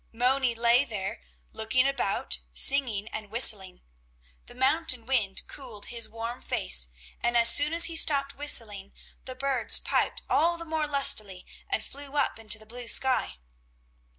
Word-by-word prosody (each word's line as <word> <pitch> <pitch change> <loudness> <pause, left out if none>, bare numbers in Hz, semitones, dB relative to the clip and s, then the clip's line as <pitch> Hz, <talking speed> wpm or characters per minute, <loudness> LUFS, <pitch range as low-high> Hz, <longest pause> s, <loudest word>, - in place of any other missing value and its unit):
Moni 250 +1 0
lay 235 +3 +2
there, 205 - -6 0.3
looking 255 +4 0
about, 245 - -2
singing 235 - +3
and 215 -1 -7
whistling. 205 -5 +3 0.6
The - - -13
mountain 260 -2 0
wind 220 -7 0
cooled 240 -7 -9
his 230 -2 -3
warm 230 +2 -7
face, - - 0 0.3
and 240 0 0
as 230 0 +7
soon 290 +5 +4
as 335 0 +6
he 335 - -2
stopped 280 -3 +2
whistling, 215 -9 0 0.3
the 255 - -8
birds 270 -4 +2
piped - - -2
all 340 +2 +1
the 335 - -7
more 315 -1 -3
lustily 215 -10 -1 0.2
and 220 - -2
flew 280 0 -9
up 285 -5 -1
into 215 -1 +2
the 215 - -14
blue 240 +2 -8
sky. 260 - +2
245 Hz, 150 wpm, -26 LUFS, 220-275 Hz, 0.6 s, as